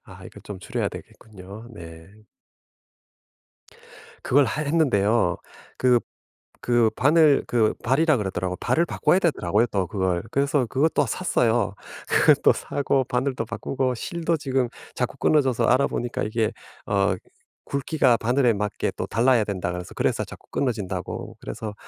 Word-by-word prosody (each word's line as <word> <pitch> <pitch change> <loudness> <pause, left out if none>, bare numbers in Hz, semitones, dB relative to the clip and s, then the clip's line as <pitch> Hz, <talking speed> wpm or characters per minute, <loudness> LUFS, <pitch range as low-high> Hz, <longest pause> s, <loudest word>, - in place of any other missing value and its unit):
아 - - -14
이거 - - -12
좀 100 -2 -8
줄여야 95 - -2
되겠군요. 105 +2 -12
네. 80 -3 -11 2.1
그걸 140 +2 +4
하 150 +6 -2
했는데요. 120 - +2 0.4
그 125 -2 +4 0.7
그 120 -2 +4
바늘 150 0 +4
그 115 -3 +2
발이라고 150 +5 +3
그러더라고. 95 -1 -3
발을 170 +10 +1
바꿔야 180 - +2
되더라고요, 115 - +1
또 95 -2 -1
그걸. 95 -2 -1
그래서 140 0 +1
그것도 140 +7 +1
샀어요. 120 - 0 0.3
그것도 - - +5
사고 135 -2 -1
바늘도 125 -1 -1
바꾸고 130 +2 -2
실도 170 +6 -2
지금 130 -4 0 0.3
자꾸 - - -3
끊어져서 130 -6 +2
알아 130 +4 +4
보니까 120 0 -3
이게 110 0 -1 0.3
어 100 -1 +1 0.5
굵기가 140 -3 +2
바늘에 120 0 +2
맞게 105 0 -2
또 - - -3
달라야 120 0 +3
된다고 95 -3 -3
그래서, 90 0 -8
그래서 - - 0
자꾸 - - -14
끊어진다고 100 -9 -3
그래서 110 -2 -6
120 Hz, 315 characters per minute, -24 LUFS, 100-140 Hz, 2.1 s, 그것도